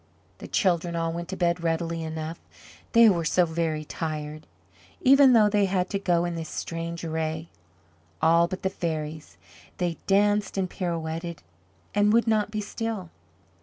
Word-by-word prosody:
The - - -8
children 175 -3 +1
all 165 0 -1
went 170 0 -5
to 190 - -3
bed 175 -1 0
readily 165 0 -1
enough, 160 +1 -5 0.5
they 230 -1 +8
were 175 -5 +3
so 175 +3 +3
very 160 -2 -2
tired, 155 -1 -5 0.5
even 270 0 +7
though 220 -3 +6
they 205 -1 +2
had 185 -1 -1
to 200 - -1
go 175 -3 +1
in 175 - -2
this 165 -2 -5
strange 170 0 -5
array. 160 0 -3 0.7
All 170 +1 +4
but 185 +2 -6
the 190 - 0
fairies 155 -3 -4 0.4
they 175 -3 -1
danced 205 +1 +2
and 190 -1 +1
pirouetted 170 -2 -4 0.5
and 205 0 +3
would 235 +1 +4
not 215 -2 +1
be 215 0 -3
still. 210 -3 -4
170 Hz, 160 wpm, -26 LUFS, 165-200 Hz, 0.7 s, they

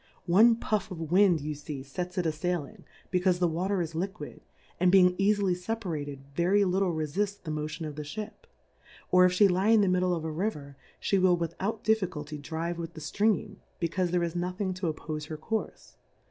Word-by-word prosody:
One 215 +7 +6
Puff 215 -3 -1
of 165 -4 -6
Wind 185 -4 +5
you 150 +1 -3
fee 145 -2 -7
fets 180 +7 -5
it 180 - 0
a 160 - +2
failing, 160 -1 -4 0.3
becaufe 180 -1 +2
the 175 -1 +2
Water 180 +3 0
is 165 0 -6
liquid, 190 +5 -5 0.4
and 180 -1 +4
being 180 -2 +6
eafily 200 -1 +2
fcpamted, 175 -7 -4 0.2
very 180 +6 +3
littb 190 -2 +1
refuis 195 +7 -2
the 160 - -4
Motion 155 +1 -4
of 150 -2 -6
the 150 - -5
Ship 215 - -8
•, - - -38 0.6
or 180 0 +7
if 180 0 +2
file 205 -1 +6
lie 185 +3 +1
in 225 -2 +6
the 200 - +3
Middle 180 -1 +2
of 160 -1 -5
a 160 - -2
River, 150 -5 -3 0.2
fhe 195 -2 +1
will 180 -1 +4
without 180 +6 -3
Difficulty 170 -9 -1
drive 165 +3 -4
with 165 0 -6
the - - -7
Stream, 210 -1 0 0.2
becaufe 175 +1 0
there 175 0 +1
is 170 0 -3
nothing 185 +2 -2
to 180 -3 -2
oppofe 155 0 -6
her 155 - -5
Courfe. 220 +8 -4
180 Hz, 200 wpm, -29 LUFS, 160-195 Hz, 0.6 s, or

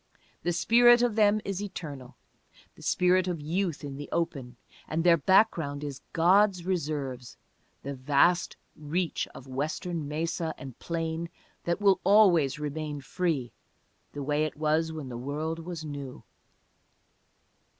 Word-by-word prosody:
The 175 - 0
spirit 240 +7 +5
of 240 -2 +2
them 215 -1 +4
is 195 0 -3
eternal, 150 -10 -7 0.6
the - - -17
spirit 180 0 +2
of 175 -3 -2
youth 165 +1 -2
in 140 -1 -6
the 145 - -7
open, 140 -7 -2 0.3
and 160 +1 -1
their 175 -1 +6
background 160 -4 +2
is 140 -3 -6
"God's 185 +2 +3
Reserves," 140 -9 -3 0.5
the 140 - -4
vast 145 +6 +2 0.2
reach 160 +3 -2
of 130 - -10
Western 155 +4 -3
mesa 160 +2 -2
and 130 -2 -10
plain 165 0 -3 0.4
that 170 +1 0
will 195 -2 +4
always 180 -10 +5
remain 150 0 -4
free 150 -5 -2 0.6
"the 145 - -5
way 145 +2 0
that 155 -1 -1
it - - -25
was 155 +1 +1
when 155 -4 -6
the 120 -1 -6
world 155 +5 -3
was 165 -1 -6
new." 140 -3 -7
160 Hz, 140 wpm, -28 LUFS, 145-180 Hz, 0.6 s, their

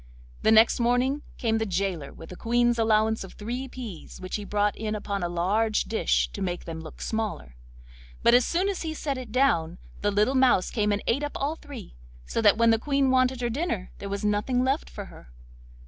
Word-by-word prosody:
The - - +4
next 220 +2 +6
morning 245 +4 +2 0.2
came 225 -2 0
the - - 0
gaoler 180 -6 -2
with 165 - -12
the 180 - -8
Queen's 240 +2 +1
allowance 220 -1 +2
of 190 - -10
three 245 +5 -5
peas, 235 -9 -9
which 185 0 -5
he 210 - -6
brought 205 0 0
in 215 -1 -3
upon 200 -1 -3
a 175 - -1
large 205 +6 +1
dish 225 - +1
to 200 - -8
make 180 -2 -3
them 160 -1 -6
look 160 - -9
smaller; 215 - -3 0.7
but 235 - +6
as 245 +1 +6
soon 360 +8 0
as 400 -2 -2
he 315 -1 -3
set 280 -4 -3
it 245 -4 -8
down 180 -10 +2 0.2
the 205 - +2
little 210 +6 +2
mouse 255 -8 +3
came 210 -3 +1
and 205 0 -1
ate 255 +5 +1
up 290 0 -3
all 290 +3 -1
three, 285 - -10 0.3
so 230 - -1
that 210 -1 +5
when 230 0 +5
the 225 - +3
Queen 275 0 +1
wanted 255 -1 +2
her 240 - 0
dinner 235 - -2
there 200 - -6
was 200 +1 -3
nothing 210 +5 +1
left 270 +4 0
for 205 - -7
her. - - -15
220 Hz, 215 wpm, -26 LUFS, 200-255 Hz, 0.7 s, next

